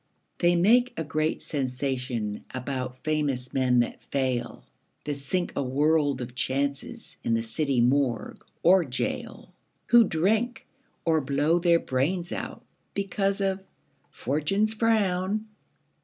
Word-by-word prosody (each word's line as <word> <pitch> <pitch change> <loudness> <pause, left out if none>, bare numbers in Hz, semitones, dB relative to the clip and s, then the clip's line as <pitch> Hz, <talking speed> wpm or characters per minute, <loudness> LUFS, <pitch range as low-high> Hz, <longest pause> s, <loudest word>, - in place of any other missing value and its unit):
They 175 0 +4
make 240 +8 +4
a 160 - -1
great 155 +1 -1
sensation 125 -6 -2
About 130 0 -4
famous 145 -5 -1
men 125 -2 +3
that 120 - -4
fail, 130 -3 -2 0.4
That 150 - -2
sink 175 +6 -1
a - - 0
world 145 +1 +1
of 125 0 -6
chances 140 +2 -2
In 115 - +1
the 115 - 0
city 135 +2 0
morgue 125 -2 0 0.2
or 185 +1 +6
gaol, 130 -4 -4 0.4
Who 240 -1 +8
drink, 220 +10 0 0.4
or 160 -1 +3
blow 145 +5 +1
their 170 -1 +4
brains 170 +6 -1
out, - - -6 0.3
Because 200 0 0
of 195 0 0 0.5
"Fortune's 195 - 0
frown". 215 -2 +1
150 Hz, 125 wpm, -27 LUFS, 130-185 Hz, 0.5 s, Who